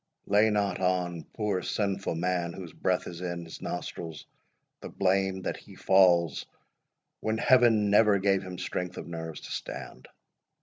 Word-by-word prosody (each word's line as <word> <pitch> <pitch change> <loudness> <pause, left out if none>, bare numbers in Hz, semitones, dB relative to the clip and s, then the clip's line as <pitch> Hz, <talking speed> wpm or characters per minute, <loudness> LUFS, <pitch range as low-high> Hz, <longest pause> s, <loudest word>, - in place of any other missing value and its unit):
—Lay 105 +2 +4
not 100 -3 0
on 90 -2 0
poor 105 -4 -1
sinful 100 -4 -1
man, 85 0 -1
whose 90 -3 -9
breath - - 0
is 85 0 -7
in, 85 -1 -4
his 80 - -10
nostrils, 80 -3 -5 0.5
the - - -8
blame 95 0 +1
that - - -2
he - - -14
falls, 90 -5 +4 0.8
when 110 0 -1
Heaven 115 -4 +4
never 105 -1 +5
gave 95 0 +2
him 90 -1 -7
strength 90 0 -4
of - - -6
nerves 80 -2 -6
to - - -9
stand! 65 - -7
95 Hz, 150 wpm, -28 LUFS, 85-100 Hz, 0.8 s, never